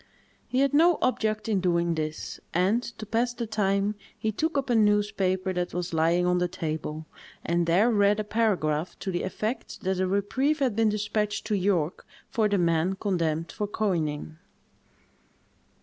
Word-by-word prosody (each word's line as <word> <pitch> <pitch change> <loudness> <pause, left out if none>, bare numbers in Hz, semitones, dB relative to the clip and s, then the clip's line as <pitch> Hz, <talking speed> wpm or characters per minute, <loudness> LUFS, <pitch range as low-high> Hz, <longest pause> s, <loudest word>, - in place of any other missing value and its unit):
He 255 - +1
had 275 0 +2
no 330 +3 +5
object 215 -4 0
in 210 -3 +1
doing 170 -1 +1
this; 155 -1 -4 0.2
and, 190 +7 +3
to 235 -3 -8
pass 235 +3 0
the 235 - -3
time, 205 -1 +1 0.2
he 220 - -1
took 315 +8 -1
up 270 -2 -1
a - - +3
newspaper 205 -3 +2
that 180 -1 -3
was 180 -1 -3
lying 165 +2 +2
on 180 0 +2
the 180 - +1
table, 155 -2 -4 0.4
and 170 0 +1
there 195 +8 +4
read 205 -1 +3
a - - 0
paragraph 185 -8 0
to 190 - -4
the 175 - -1
effect 215 +6 -4
that 190 0 -1
a 185 - +1
reprieve 255 +10 +1
had 260 -7 0
been 225 -1 +3
despatched 210 0 -1
to 215 - 0
York, 180 -4 0 0.2
for 215 -2 +2
the 200 - +2
men 170 +1 +1
condemned 165 -5 -1
for 210 - -3
coining. 160 -7 -2
200 Hz, 170 wpm, -27 LUFS, 175-220 Hz, 0.4 s, no